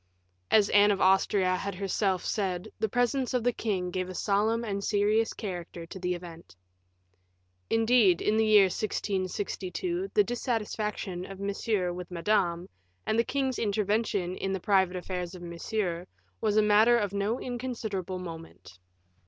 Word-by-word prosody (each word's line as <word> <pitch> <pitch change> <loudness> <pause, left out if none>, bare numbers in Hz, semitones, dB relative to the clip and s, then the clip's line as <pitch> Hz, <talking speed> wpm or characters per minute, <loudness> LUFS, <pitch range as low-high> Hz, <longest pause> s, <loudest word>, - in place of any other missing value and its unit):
As 210 -2 +4
Anne 205 0 +6
of 200 -2 +1
Austria 190 0 +3
had 200 +1 -4
herself 195 0 -1
said, 185 -4 -2
the 220 0 0
presence 245 +3 0
of 245 - +1
the 245 0 +2
king 185 -6 -2
gave 185 0 -3
a 185 - -7
solemn 215 +5 +1
and 200 -3 -3
serious 210 +2 +2
character 175 -4 -6
to 190 - -9
the 180 0 -1
event. 170 - -11 1.1
Indeed, 225 -5 +4
in 210 - +1
the 220 0 +3
year 210 -2 +7
1662, 205 - -2
the 415 - +6
dissatisfaction 210 - -3
of 195 -1 -9
Monsieur 200 -2 -1
with 180 0 -7
Madame, 175 -1 0 0.4
and 220 - +1
the - - +5
king's 265 0 -1
intervention 205 -3 0
in 195 - -2
the 190 - -2
private 190 -1 +2
affairs 180 0 -4
of 175 - -10
Monsieur, 175 +1 -3 0.3
was 215 -1 +1
a 215 - +6
matter 215 +3 +5
of 205 -4 -1
no 200 +4 -1
inconsiderable 225 -7 -4
moment. 165 - -10
200 Hz, 155 wpm, -28 LUFS, 180-220 Hz, 1.1 s, year